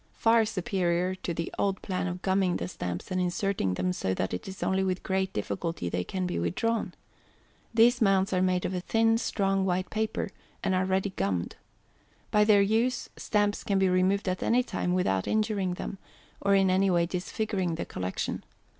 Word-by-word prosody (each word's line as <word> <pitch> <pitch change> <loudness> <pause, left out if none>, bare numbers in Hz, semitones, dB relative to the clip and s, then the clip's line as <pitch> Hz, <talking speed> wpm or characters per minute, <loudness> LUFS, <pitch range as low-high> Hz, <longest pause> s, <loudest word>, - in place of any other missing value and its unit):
Far 225 0 +4
superior 180 -2 0
to 185 -1 -5
the 170 0 -4
old 195 -1 +1
plan 185 -1 -2
of 180 0 -5
gumming 190 -2 +2
the 85 - -3
Stamps, 90 - -5
and 185 0 +1
inserting 180 - 0
them 180 - 0
so 95 - -1
that 95 - -2
it 90 - -4
is 190 -2 -6
only 190 +1 +1
with 185 -1 -1
great 190 0 0
difficulty 100 - -3
they 90 +1 -1
can 185 - -3
be 180 - -2
withdrawn. 230 +4 -1 0.8
These 235 +2 +4
Mounts 195 -1 +3
are 185 - +2
made 185 -1 +1
of 185 - -2
a 180 - -1
thin 225 +4 +2
strong 195 -4 0
white 185 -1 -1
paper, 220 -2 -2 0.3
and 190 - +1
are 185 0 +2
ready 190 +1 0
gummed. 95 - -2 0.8
By 210 0 +4
their 205 -2 +6
use, 230 +4 +1
Stamps 205 -1 0
can 200 - +1
be 190 -1 +3
removed 185 +2 +2
at 185 0 -1
any 245 +2 +3
time 180 -7 -2
without 95 - +1
injuring 210 -4 0
them, 195 - -6 0.4
or 200 0 +3
in 195 -1 +4
any 190 +1 +3
way 170 -2 +3
disfiguring 185 0 -2
the 165 - -4
Collection. 90 0 -3
190 Hz, 190 wpm, -28 LUFS, 180-200 Hz, 0.8 s, their